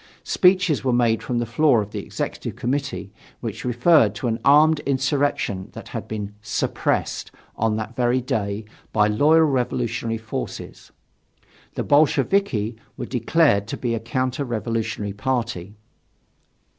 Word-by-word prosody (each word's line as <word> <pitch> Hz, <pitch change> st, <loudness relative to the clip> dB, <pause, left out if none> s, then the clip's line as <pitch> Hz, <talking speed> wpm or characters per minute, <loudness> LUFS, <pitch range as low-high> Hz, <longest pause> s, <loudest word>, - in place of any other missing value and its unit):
Speeches 185 Hz, -4 st, +3 dB
were 130 Hz, -, +1 dB
made 120 Hz, -2 st, +2 dB
from 125 Hz, -, -2 dB
the 120 Hz, -, 0 dB
floor 125 Hz, +2 st, +3 dB
of 105 Hz, -1 st, -4 dB
the -, -, -4 dB
Executive -, -, -5 dB
Committee, 135 Hz, -5 st, -3 dB, 0.3 s
which 110 Hz, -2 st, -5 dB
referred 125 Hz, -, +4 dB
to -, -, -5 dB
an 115 Hz, -1 st, 0 dB
armed 150 Hz, +2 st, +6 dB
insurrection 135 Hz, -7 st, 0 dB
that -, -, -9 dB
had -, -, -5 dB
been 105 Hz, -2 st, -5 dB
"suppressed" 105 Hz, -, -1 dB, 0.3 s
on 110 Hz, 0 st, +1 dB
that 110 Hz, +2 st, -5 dB
very 125 Hz, +1 st, +2 dB
day 105 Hz, -3 st, -2 dB, 0.3 s
by 105 Hz, -1 st, +4 dB
loyal 150 Hz, +10 st, +4 dB
revolutionary 120 Hz, -4 st, -1 dB
forces. 110 Hz, +1 st, -7 dB, 0.8 s
The -, -, -1 dB
Bolsheviki 145 Hz, -, +2 dB, 0.2 s
were -, -, -4 dB
declared 125 Hz, -4 st, +2 dB
to -, -, -4 dB
be 120 Hz, -2 st, -1 dB
a 115 Hz, -, -1 dB
counter 130 Hz, +4 st, -2 dB
revolutionary 115 Hz, -3 st, -2 dB
party. 115 Hz, -5 st, -2 dB
120 Hz, 135 wpm, -23 LUFS, 110-140 Hz, 0.8 s, armed